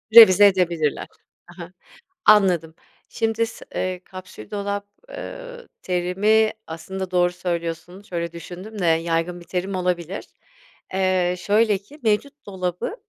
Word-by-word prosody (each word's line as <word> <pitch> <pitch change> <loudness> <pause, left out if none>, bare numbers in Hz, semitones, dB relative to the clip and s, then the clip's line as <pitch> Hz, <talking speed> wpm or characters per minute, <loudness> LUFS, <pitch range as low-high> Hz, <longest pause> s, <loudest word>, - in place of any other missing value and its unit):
Revize 205 -3 +10
edebilirler. 170 -6 0 0.4
Ha - - -15
ha. - - -12 0.5
Anladım. 180 -6 +4 0.3
Şimdi 225 0 0
s 225 - -11
eee, 185 -1 -2
kapsül 185 -14 -11
dolap, 200 0 -3 0.2
eee, - - -8
terimi 200 +5 +2 0.2
aslında 185 +3 -6
doğru 175 -1 +3
söylüyorsun 170 +1 -4
şöyle 170 -5 -4
düşündüm 180 +6 -9
de 180 - 0
yaygın 165 +1 +1
bir 170 - -14
terim 190 +2 -3
olabilir. 180 0 -2 0.7
Eee, 185 -1 +1
şöyle 210 +1 +3
ki, 275 +11 -17
mevcut 275 +7 0
dolabı 185 - -3
185 Hz, 125 wpm, -23 LUFS, 175-210 Hz, 0.7 s, Revize